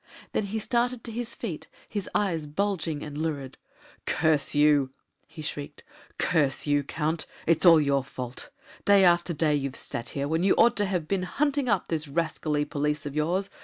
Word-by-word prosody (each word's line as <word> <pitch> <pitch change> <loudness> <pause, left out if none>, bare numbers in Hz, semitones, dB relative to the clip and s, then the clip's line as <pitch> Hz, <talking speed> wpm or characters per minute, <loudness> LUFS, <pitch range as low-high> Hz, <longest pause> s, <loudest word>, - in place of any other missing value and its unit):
Then 215 - 0
he 205 +3 -3
started 240 +2 0
to 230 - -5
his 235 +1 -4
feet, 180 -10 -5 0.2
his 205 -3 -4
eyes 165 -7 0
bulging 165 -2 -2
and 150 -1 -7
lurid. 145 -4 -4 0.5
"Curse 155 -2 +1
you!" 145 -2 +4 0.4
he 160 0 -9
shrieked; 145 -1 -5 0.3
"curse 140 -4 +1
you, 145 -1 +2
Count! 155 +3 -1 0.2
it's 165 +2 +3
all 165 -2 +9
your 140 -2 +2
fault! 125 -2 -7 0.3
Day 200 -1 +6
after 175 0 +4
day 155 -1 +1
you've 140 -2 -1
sat 115 - -2
here, 140 0 -1
when 160 +2 0
you 190 +1 +4
ought 235 - +5
to 205 -1 +2
have 180 -5 -2
been 195 +1 0
hunting 280 +7 0
up 200 -4 +1
these 155 -2 -2
rascally 155 -1 -1
police 150 0 -2
of 145 0 -5
yours. 180 +6 0
160 Hz, 180 wpm, -27 LUFS, 145-195 Hz, 0.5 s, all